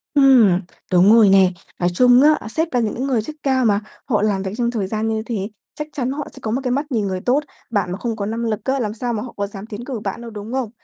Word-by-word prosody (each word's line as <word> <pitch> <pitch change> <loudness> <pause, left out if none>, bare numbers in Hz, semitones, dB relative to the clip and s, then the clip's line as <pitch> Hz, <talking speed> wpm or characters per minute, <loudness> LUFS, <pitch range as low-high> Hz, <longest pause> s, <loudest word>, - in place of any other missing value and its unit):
Ừm, 250 -10 +6 0.3
đúng 180 +2 +5
rồi 220 -3 +6
này. 190 -1 +5 0.3
Nói 175 - +2
chung 245 +7 +5
á, 300 -6 +3
sếp 320 +6 -2
là 245 - +3
những 235 +3 -1
người 250 -5 +1
chức 300 +8 -8
cao 260 -2 +2
mà, 205 -2 +3 0.3
họ 215 -6 +1
làm 205 -2 0
việc 190 - -3
trong 240 -1 0
thời 210 -5 -2
gian 215 +2 -2
như 220 -1 -1
thế, 210 -4 -3 0.3
chắc 300 - -5
chắn 260 -2 -2
họ 290 +1 -4
sẽ - - -12
có 220 - -3
một 255 +4 -1
cái 250 - -1
mắt 285 +3 -2
nhìn 215 -5 0
người 185 -1 -3
tốt. 265 +7 +1 0.3
Bạn 200 -6 -1
mà 185 - -3
không 230 +2 -3
có 205 -2 -3
năng 225 +3 -3
lực 215 -2 -1
á, 270 +1 0
làm 215 -4 -2
sao 240 +2 -3
mà 215 - -2
họ 245 - -9
có 200 0 -1
dám 200 0 -9
tiến 220 +2 -8
cử 255 -4 -4
bạn 215 - -5
đâu, 235 -1 -8
đúng 210 +2 -7
không? 260 -4 -1
225 Hz, 290 wpm, -20 LUFS, 205-255 Hz, 0.3 s, Ừm